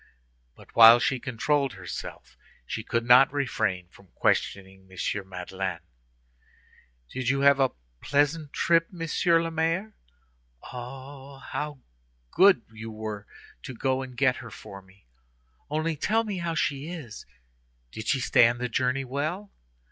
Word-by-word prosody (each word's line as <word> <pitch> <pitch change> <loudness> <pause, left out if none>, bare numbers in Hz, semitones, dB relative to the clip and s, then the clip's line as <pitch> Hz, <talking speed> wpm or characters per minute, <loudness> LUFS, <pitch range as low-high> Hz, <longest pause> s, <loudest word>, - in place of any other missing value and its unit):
But - - -18
while 115 +1 +10
she 130 +2 0
controlled 135 +2 0
herself 95 -3 -8 0.3
she - - -5
could 115 0 -1
not 125 +3 +7
refrain 100 -10 -1
from 95 +3 -19
questioning 95 -1 -1
M. 95 +1 -3
Madeleine. 95 -1 -5 1.3
"Did 130 -2 -2
you 135 +1 +1
have 140 0 +5
a 135 -1 +4 0.3
pleasant 145 +1 0
trip, 165 0 +2
Monsieur 165 -1 +1
le 165 - -3
Maire? 165 +6 -1 0.8
Oh! 135 +2 -9
how 145 0 -6 0.5
good 190 - +5
you 110 0 -8
were 110 -2 -6 0.3
to 130 - -8
go 130 +2 0
and 130 -2 -9
get 130 -1 +3
her 115 - -9
for 100 -2 -11
me! 95 -2 -24 0.6
Only 155 +2 -1
tell 220 +9 +1
me 205 -4 -4
how 170 -1 -2
she 140 -1 -1
is. 150 -11 -8 0.6
Did 110 - -7
she 135 - +2
stand 120 0 +4
the 125 0 -2
journey 130 +3 0
well? 155 +10 -3
130 Hz, 140 wpm, -27 LUFS, 110-150 Hz, 1.3 s, while